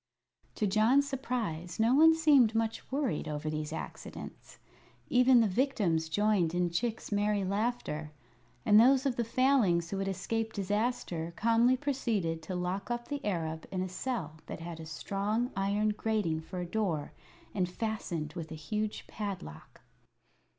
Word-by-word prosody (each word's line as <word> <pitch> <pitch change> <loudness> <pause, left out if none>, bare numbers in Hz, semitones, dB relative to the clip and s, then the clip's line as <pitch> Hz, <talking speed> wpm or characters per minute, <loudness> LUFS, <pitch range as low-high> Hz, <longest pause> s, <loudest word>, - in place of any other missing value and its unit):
To - - 0
John's 220 +8 +4
surprise 225 - -3
no 225 +3 +4
one 320 +3 +7
seemed 280 -9 +5
much 225 +2 -2
worried 270 - -1
over 150 0 -3
these 155 0 -3
accidents. 160 - -8 0.5
Even 250 -1 +6
the 225 - +3
victims 185 - +1
joined 195 -3 +2
in 175 -1 +1
Chick's 220 +7 -2
merry 205 0 +1
laughter, 195 -7 -2 0.5
and 210 0 +7
those 265 +3 +5
of 265 -3 +1
the 235 - 0
Failings 230 -9 +2
who 195 - -2
had 195 - -1
escaped 220 +4 -2
disaster 200 -5 -1
calmly 235 +3 +3
proceeded 225 - -1
to 185 +3 -5
lock 180 +3 -3
up 240 0 -3
the 285 -1 -4
Arab 160 -5 -2
in 185 -1 -1
a - - -3
cell 185 - -4
that - - -6
had 165 0 -7
a 160 - -8
strong 205 - -2
iron 200 +2 +1
grating 210 -7 -1
for 175 +3 -8
a 175 - -2
door, 175 -6 -2 0.4
and 180 -3 0
fastened 180 -7 -3
with 160 -1 -6
a - - -5
huge 210 +8 -3
padlock. 195 - -7
205 Hz, 155 wpm, -31 LUFS, 170-235 Hz, 0.5 s, one